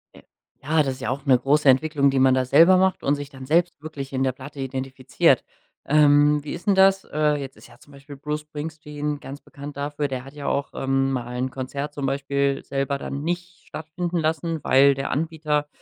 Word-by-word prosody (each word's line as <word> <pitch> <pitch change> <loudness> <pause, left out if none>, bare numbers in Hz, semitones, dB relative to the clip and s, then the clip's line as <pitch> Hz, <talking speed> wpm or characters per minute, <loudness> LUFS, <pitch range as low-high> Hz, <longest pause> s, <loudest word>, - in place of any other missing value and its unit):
Äh, - - -16 0.4
ja, 155 +2 +2
das 135 -2 -2
ist 130 - -14
ja 130 - -2
auch 140 +2 -4
'ne 130 -3 +5
große 140 +2 +2
Entwicklung, 140 +1 +3
die 135 -1 +1
man 130 0 +5
da 130 -1 +1
selber 170 +8 +6
macht 190 0 +1
und 140 - +2
sich 145 -1 -7
dann 135 -2 -11
selbst 170 +4 +2
wirklich 140 -3 -7
in 130 0 0
der 130 - +1
Platte 140 +3 -11
identifiziert. 130 -1 0 0.4
Ähm, 145 0 +4
wie 150 - -6
ist 170 +4 -9
'n 200 - +4
das? 195 0 +4
Äh, 150 0 +1
jetzt 135 -1 -8
ist - - -15
ja 120 - -18
zum 145 +3 -19
Beispiel 140 +1 -12
Bruce 150 +2 -4
Springsteen 150 -1 -5
ganz 140 +2 -9
bekannt 145 0 -10
dafür 145 +1 -2
der 130 -1 -5
hat 135 - -12
ja 145 -1 -7
auch, 140 - -1
ähm, 135 0 0
mal 125 -1 -4
'n 130 +1 -2
Konzert 140 +3 -5
zum 140 -2 -4
Beispiel 140 0 -1
selber 140 0 -2
dann 140 +1 -5
nicht 175 +1 -5
stattfinden 170 +3 -4
lassen, 160 0 -1
weil 140 +1 +5
der 135 0 -4
Anbieter 150 -1 -1
145 Hz, 215 wpm, -23 LUFS, 135-155 Hz, 0.4 s, selber